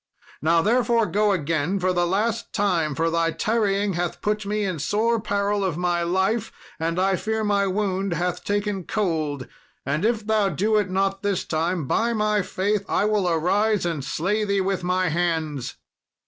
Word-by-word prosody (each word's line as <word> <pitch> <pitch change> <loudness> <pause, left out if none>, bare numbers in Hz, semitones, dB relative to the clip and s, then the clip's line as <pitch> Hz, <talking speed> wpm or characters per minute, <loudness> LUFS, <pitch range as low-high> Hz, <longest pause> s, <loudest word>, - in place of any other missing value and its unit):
Now, 165 +1 +3
therefore, 235 0 +3
go 210 0 +2
again 165 +1 0
for 185 0 +1
the 175 -1 +1
last 215 +5 -1
time, 170 -8 +1
for 165 +2 0
thy 165 0 +1
tarrying 205 0 0
hath 175 0 -2
put 210 0 -1
me 210 +1 -1
in 185 -5 -2
sore 220 +9 +1
peril 205 -1 0
of 180 -5 -1
my 175 -1 0
life, 190 +6 0 0.3
and 165 +2 -1
I 190 +1 +2
fear 220 +4 -2
my 200 -1 +2
wound 195 -1 -1
hath 180 +2 -2
taken 205 -2 -1
cold; 155 - -1 0.4
and 145 +5 -1
if 220 -1 +1
thou 215 -2 +2
do 205 +7 0
it 205 -3 +1
not 195 +1 0
this 200 -3 -1
time, 165 0 -1
by 230 - +1
my 210 -1 +1
faith 200 +2 -1
I - - +2
will 210 -4 +1
arise 195 +5 +1
and 165 -5 -2
slay 190 +10 -1
thee 200 -1 +1
with 190 -1 -1
my 180 0 +1
hands." 160 -5 -1
195 Hz, 175 wpm, -24 LUFS, 170-210 Hz, 0.4 s, Now